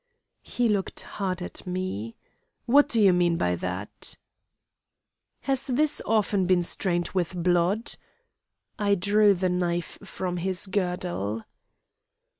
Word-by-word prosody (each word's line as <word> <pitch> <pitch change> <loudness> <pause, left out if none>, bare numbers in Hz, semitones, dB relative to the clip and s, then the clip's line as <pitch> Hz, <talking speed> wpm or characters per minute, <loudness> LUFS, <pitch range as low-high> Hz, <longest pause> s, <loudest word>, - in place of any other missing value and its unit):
"He 245 -1 0
looked 205 -3 -1
hard 185 -2 -3
at 180 - -7
me. 180 - -3 0.5
'What 285 +4 +5
do 230 - +2
you 195 -3 +6
mean 175 -1 +2
by 90 - +1
that?' 90 +3 -5 1.2
"'Has 270 0 0
this 295 +4 +2
often 205 -3 +2
been 180 -1 +3
stained 175 0 -1
with 180 -1 -2
blood?' 180 +5 +1 0.9
I 200 -1 +3
drew 205 +2 +4
the 185 +1 0
knife 175 -1 -2
from 185 -2 -4
his 185 +2 0
girdle. 180 - -2
185 Hz, 120 wpm, -26 LUFS, 175-205 Hz, 1.2 s, you